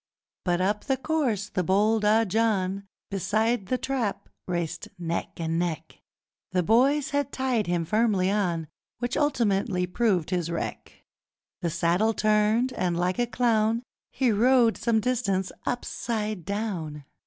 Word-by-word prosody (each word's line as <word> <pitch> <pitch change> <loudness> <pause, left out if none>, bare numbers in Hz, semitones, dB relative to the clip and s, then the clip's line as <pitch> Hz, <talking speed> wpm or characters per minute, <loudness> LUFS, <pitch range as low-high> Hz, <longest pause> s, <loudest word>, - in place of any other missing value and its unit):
But 175 -1 +1
up 205 +2 0
the 270 -2 +1
course 260 -9 0
the 185 -3 -1
bold 210 +4 +2
Ah 220 +2 +4
John 200 -2 0 0.2
Beside 215 +2 0
The 255 - +1
Trap 250 -6 -2 0.2
raced 175 -3 -3
neck 170 -1 -4
and 165 0 -1
neck: 170 -3 -3 0.5
The 180 -1 +2
boys 270 - +3
had 285 -1 0
tied 255 -6 0
him 175 -1 0
firmly 205 -1 +2
on, 175 -6 0 0.3
Which 245 +1 -2
ultimately 205 -9 +1
proved 185 -3 0
his 175 -3 0
wreck, 170 - -5 0.6
The 170 - 0
saddle 175 +7 +1
turned, 215 +4 +2
and, 175 -5 -1
like 180 +4 0
a 240 - +2
clown, 230 -1 +1 0.3
He 255 -3 +1
rode 235 +2 +4
some 225 -2 +1
distance 205 -6 0 0.2
upside 215 -6 -3
down. 180 -8 -3
210 Hz, 140 wpm, -26 LUFS, 180-235 Hz, 0.6 s, Ah